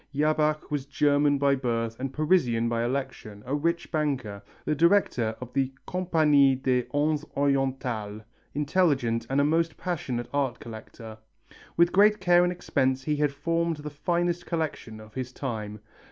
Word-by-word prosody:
Jabach 155 +1 +1
was 145 -2 -1
a - - -35
German 145 0 +3
by 140 0 +3
birth 115 -3 -2
and 135 0 -3
Parisian 135 -7 +2
by 115 0 0
election, 120 -5 -4
a 130 - -4
rich 170 +4 -1
banker, 135 -10 -2 0.2
the - - +1
director 150 - +2
of 125 -1 -9
the 135 -1 0
Compagnie 155 -7 +3
des 130 -1 0
Indes 150 +1 +1
Orientales, 130 -6 -1 0.3
intelligent 145 -7 +1
and 135 +1 +1
a - - +4
most 165 +1 +1
passioned 130 -9 -3
art 135 -4 -1
collector. 110 -1 -10 0.6
With 170 +1 +5
great 210 +2 +5
care 175 -1 +4
and 180 - +1
expense 135 -7 0
he 150 +1 -1
had 145 -1 +1
formed 165 +3 -1
the 150 0 -7
finest 175 +3 -1
collection 155 -9 -3
of 110 0 -14
his 130 0 -5
time. 110 -6 -5
140 Hz, 155 wpm, -27 LUFS, 125-155 Hz, 0.6 s, With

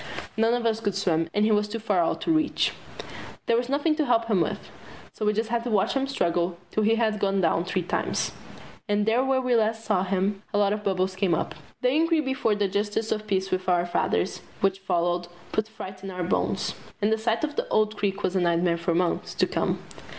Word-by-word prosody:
None 225 +2 +3
of 240 -1 -2
us 225 -1 +1
could 205 -4 -1
swim, 165 -4 +1
and 210 +3 +2
he 220 - +3
was 210 0 +2
too 220 +2 -4
far 215 -4 0
out 170 - +1
to - - 0
reach. 315 -1 +2 0.7
There 230 - +3
was 240 +1 0
nothing 290 +3 +2
to 310 - +2
help 230 -2 +3
him 210 -6 +2
with, - - -3 0.4
so 215 - -2
we - - +5
just 220 +2 -1
had 235 -1 0
to - - -1
watch 210 -4 +2
him 270 0 0
struggle 175 -8 0
till 215 - 0
he 220 +2 +4
had 220 -2 +1
gone 195 -1 +1
down 170 -1 +2
three 185 0 -1
times. - - -1 0.6
And 205 0 +2
there 230 +4 +3
where 265 0 +2
we 250 -1 +1
last 225 -1 +1
saw 210 -4 +2
him 195 +1 0
a - - +3
lot 205 0 +3
of 210 0 -4
bubbles 190 -1 0
came 190 -3 +2
up. - - -2 0.3
The 250 - +4
inquiry 325 +3 +3
before 265 -6 +1
the 205 -1 +1
Justice 205 +3 -1
of 215 0 -2
Peace 190 -1 0
with 185 0 -1
our 175 -1 +3
fathers, 175 +1 0 0.2
which 195 0 +1
followed, 175 -2 0 0.2
put 215 0 0
fright 190 -3 -9
in 195 - -5
our 180 -1 -3
bones, 175 - 0 0.3
and 210 0 +1
the - - +1
sight 225 +3 0
of 300 -1 -2
the - - -1
old 215 0 +2
creek 200 -1 -2
was 185 - 0
a - - +3
nightmare 170 0 +2
for 170 0 0
months 175 0 0
to - - +3
come. - - -1
210 Hz, 235 wpm, -26 LUFS, 185-225 Hz, 0.7 s, we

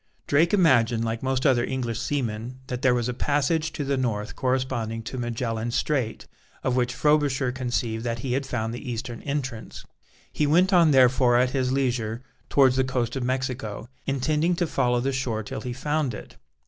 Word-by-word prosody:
Drake 160 +4 +3
imagined, 120 - +3
like 115 0 -2
most 130 0 -1
other 125 -4 +4
English 120 -4 -2
seamen, 125 -2 -3
that 125 -1 -3
there 130 -2 +4
was 120 -1 0
a 125 - -2
passage 150 +4 0
to 145 - -3
the 140 0 0
north 110 -5 -2
corresponding 125 -4 -1
to 120 +5 -6
Magellan's 115 -1 -2
Strait, 130 -7 -1 0.4
of 130 - +1
which 125 0 0
Frobisher 145 -4 +2
conceived 120 -3 -2
that 115 -1 -2
he 125 - -1
had 135 +1 -1
found 115 -3 -2
the 120 - -6
eastern 120 0 -5
entrance. 130 -6 -5 0.5
He 150 - +1
went 180 +6 +4
on 170 -3 +6
therefore 130 -2 +5
at 125 +1 +2
his 130 -2 0
leisure 125 -3 -1 0.3
towards 130 -2 +4
the 130 - +4
coast 125 -2 -1
of 135 - -2
Mexico, 125 -4 -3 0.2
intending 150 +5 +1
to 175 - 0
follow 125 -5 +1
the 135 +2 -1
shore 120 -5 -2
till 105 - -6
he 125 - -4
found 145 -1 -1
it. - - -11
130 Hz, 185 wpm, -25 LUFS, 120-135 Hz, 0.5 s, on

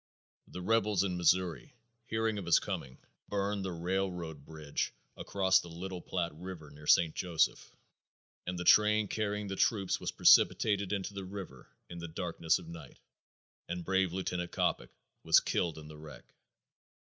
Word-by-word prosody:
The 90 - -8
rebels 105 -1 +2
in 95 -2 -1
Missouri, 90 - +1 0.3
hearing 110 -1 -1
of 90 - -7
his 85 - +6
coming, 65 -1 -4 0.3
burned 100 0 -1
the 95 - -3
railroad 85 -3 -3
bridge 75 -1 -4 0.2
across 95 -1 +2
the - - -8
Little 90 +2 -6
Platte 85 -3 -2
river 85 -5 -8
near 75 +1 -13
St. 80 -2 +5
Joseph, 85 -3 0 0.7
and 90 0 -3
the 90 - -3
train 105 +2 +5
carrying 105 0 -2
the 95 - -4
troops 100 -2 +1
was - - -3
precipitated 100 -2 +4
into 100 0 -2
the 100 -1 -5
river 95 -8 -8 0.2
in 85 - -8
the 85 - -6
darkness 85 -1 0
of 90 -3 -11
night 80 -5 -10 0.7
and 90 -1 -4
brave 95 -2 +1
Lieutenant 90 -1 -3
Coppock - - -1 0.3
was - - +6
killed 85 -3 -1
in 75 -1 -10
the 75 0 -11
wreck." 75 -4 -13
90 Hz, 155 wpm, -32 LUFS, 85-100 Hz, 0.7 s, his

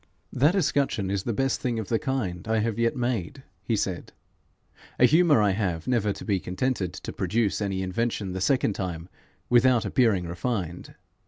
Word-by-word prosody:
'That 145 +8 +3
escutcheon 140 - 0
is 100 -1 0
the 120 - 0
best 135 +4 0
thing 120 -2 -1
of 110 -3 -4
the 115 - +1
kind 115 - -3
I 110 0 +1
have 110 0 -1
yet 115 +2 +1
made,' 120 - -2 0.2
he - - -1
said. - - -3 0.9
'A 125 - +7
humour 155 -4 +5
I 100 - +3
have, 95 -5 -2
never 115 -5 +1
to - - -7
be 100 -4 +1
contented 95 0 -2
to - - -7
produce 110 -2 0
any 95 -2 -1
invention 100 +1 -2
the 95 0 -4
second 125 -1 +2
time, 90 -3 -5 0.4
without 125 -2 +4
appearing 100 -4 +2
refined. 90 -1 -4
110 Hz, 175 wpm, -26 LUFS, 95-125 Hz, 0.9 s, A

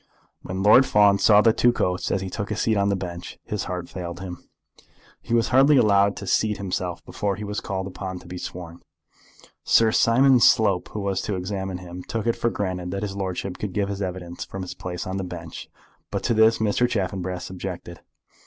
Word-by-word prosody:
When 95 +1 -4
Lord 115 +6 +7
Fawn 100 -1 +4
saw 105 0 +6
the 115 0 +4
two 120 +1 +4
coats 90 -6 -1
as 95 - 0
he 95 - -4
took 100 -2 -4
his 105 - -3
seat 110 - +2
on 100 0 +2
the 100 - +1
bench 90 -2 -7
his 105 - -4
heart 90 -1 -4
failed 85 -1 -6
him. 90 -2 -7 0.8
He - - -11
was 115 - +2
hardly 135 +3 +5
allowed 100 -3 +4
to 100 - -6
seat 105 +2 +1
himself 90 -2 -4
before 100 -1 -2
he 105 - -7
was 105 0 -3
called 95 -1 -4
upon 95 -1 -6
to 90 - -13
be 90 0 -7
sworn. 85 -2 -8 0.8
Sir 115 -1 +4
Simon 130 +4 +5
Slope, 110 -6 +4
who 105 - -3
was 100 -1 -1
to 105 - -3
examine 95 0 -4
him, 90 0 -9
took 110 +4 -4
it 115 - +1
for 120 - 0
granted 90 -4 -3
that 100 +2 -3
his 100 -2 -4
lordship 95 -1 -4
could 105 -3 -4
give 100 0 -1
his 100 0 -4
evidence 90 -2 -5
from 95 - -7
his 90 - -6
place 90 -1 -6
on 95 +1 -3
the 95 - -3
bench, 85 -3 -8 0.4
but - - -3
to - - +1
this 110 0 +5
Mr. 110 +3 +1
Chaffanbrass 95 -4 -3
objected. 90 -2 -7
95 Hz, 210 wpm, -24 LUFS, 90-105 Hz, 0.8 s, Lord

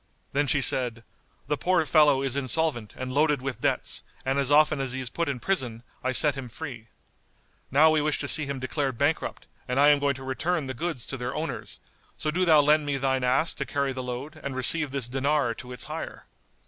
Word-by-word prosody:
Then 145 +1 +1
she 140 0 +2
said, 120 -3 +1 0.4
"The 150 +1 0
poor 180 -3 +2
fellow 145 -2 +4
is 135 -2 0
insolvent 135 -4 -1
and 130 0 -5
loaded 150 0 +2
with 130 -3 -5
debts, - - -1 0.2
and 135 +1 +1
as 135 -2 +2
often 150 -1 +4
as 130 -2 -2
he 130 - -3
is 125 -3 -5
put 170 +2 -1
in 135 -3 -3
prison, 125 -10 -2 0.2
I 130 - 0
set 145 +3 +2
him 135 -2 -7
free. 120 -4 -8 0.8
Now 155 +4 +5
we 155 -1 +2
wish 150 0 0
to - - -3
see 155 -3 +3
him 140 -1 -3
declared 130 -1 -2
bankrupt 145 +5 -1 0.2
and 125 +1 0
I 145 +1 +7
am 145 -1 +5
going 140 -1 +1
to 130 - -9
return 155 +5 -1
the 130 - -4
goods 135 -3 -3
to 135 - -4
their 125 +1 -4
owners; 160 +2 -5 0.4
so 155 - -2
do 185 +4 +1
thou 155 -3 +6
lend 150 +1 +3
me 145 -1 -1
thine 130 -1 0
ass 130 +6 +2
to - - -3
carry 140 -2 -2
the 130 - -5
load 130 +5 -6
and 140 -2 -5
receive 145 +4 +4
this 135 -3 -2
dinar 135 0 0
to 125 +2 -10
its 125 - -6
hire. - - -7
140 Hz, 225 wpm, -26 LUFS, 130-150 Hz, 0.8 s, I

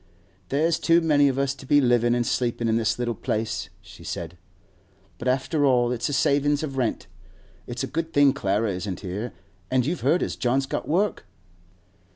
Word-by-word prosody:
'There's 155 +4 +1
too 165 0 +4
many 150 -4 +3
of 135 -1 0
us 135 0 +1
to 140 - -13
be 145 +2 +4
livin' 120 -2 +3
an' 120 - +1
sleepin' 120 0 -1
in 110 - +2
this 115 -1 +1
little 120 -1 -1
place,' 110 +1 -3
she - - -14
said; 85 0 -5 0.8
'but, 125 - -4
after 135 +4 +1
all, 125 -3 +3
it's 125 +2 -2
a - - -3
savin' 145 +2 +2
of 140 -3 -4
rent. 125 -4 -1 0.6
It's 120 +3 -4
a 135 - -6
good 165 +1 -2
thing 145 -3 +5
Clara 105 -3 0
isn't 95 0 -4
here. 100 +5 -4 0.4
An' 130 -1 +2
you've 160 +7 -2
heard 175 - +2
as - - -3
John's 130 +2 0
got - - -4
work? 180 - 0
130 Hz, 190 wpm, -25 LUFS, 115-145 Hz, 0.8 s, thing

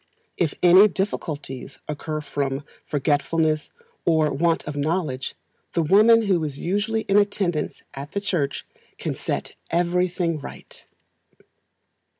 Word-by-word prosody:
If 165 -5 0
any 185 +4 +8
difficulties 150 -9 -4
occur 155 +1 -3
from 140 -1 -2 0.2
forgetfulness, 155 +2 +1 0.3
or 160 -3 +3
want 165 +3 +1
of 150 - -4
knowledge, 145 -3 -1 0.4
the 170 - +2
woman 220 +7 +6
who 185 -6 +2
is 145 -3 -4
usually 205 +7 0
in 200 -1 +2
attendance 200 -6 0
at 140 +3 -8
the 200 - 0
church 170 -9 -1 0.3
can - - -3
set - - -3 0.2
everything 175 -1 +1
right. - - -11
165 Hz, 120 wpm, -24 LUFS, 145-190 Hz, 0.4 s, any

